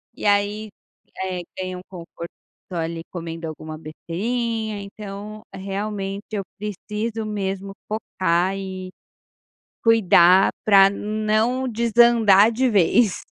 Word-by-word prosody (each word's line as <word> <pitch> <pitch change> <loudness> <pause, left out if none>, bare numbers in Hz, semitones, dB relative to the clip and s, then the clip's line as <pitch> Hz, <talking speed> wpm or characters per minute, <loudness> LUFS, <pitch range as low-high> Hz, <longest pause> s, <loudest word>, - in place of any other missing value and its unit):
E - - -7
aí, 205 +1 +2 0.6
eh, 185 -1 -3 0.2
ganha 185 -1 -4
um - - -8
conforto, 170 -2 -9 0.4
ali, 165 -1 -3
comendo 165 -1 -6
alguma 155 0 -7
besteirinha, 220 +7 -3
então 205 +1 -8
realmente, 195 +1 -4
eu 200 -2 -1
preciso 210 +2 -4
mesmo 195 -2 -3 0.2
focar 185 -4 0
e 190 -1 -6 0.9
cuidar 190 -4 +6
pra 195 -2 +7
não 215 +5 0
desandar 230 -2 +5
de 255 +3 +2
vez. 205 +1 +3
200 Hz, 105 wpm, -22 LUFS, 185-215 Hz, 0.9 s, pra